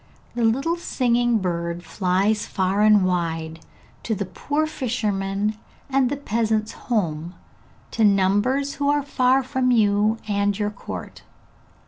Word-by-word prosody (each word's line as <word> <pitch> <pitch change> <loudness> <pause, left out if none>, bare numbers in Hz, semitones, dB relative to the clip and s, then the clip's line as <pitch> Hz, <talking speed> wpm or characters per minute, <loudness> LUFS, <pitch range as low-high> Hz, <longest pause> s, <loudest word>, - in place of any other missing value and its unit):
The 240 0 -2
little 275 +10 +1
singing 240 -6 +1
bird 170 -2 -3
flies 190 +5 0
far 190 +2 0
and 210 -2 +5
wide, 165 -3 -2 0.4
to 220 - -2
the 200 - -3
poor 290 - -2
fisherman, 215 -6 -2 0.3
and 265 -2 +3
the 285 - -2
peasant's 220 -4 -1
home, 175 -7 -2 0.6
to 225 - 0
numbers 205 +8 +2
who 285 0 -1
are 290 0 +2
far 260 -1 +2
from 260 -1 0
you 215 -1 +3
and 200 -1 0
your 210 -1 -1
court. 205 - -8
215 Hz, 130 wpm, -23 LUFS, 195-250 Hz, 0.6 s, and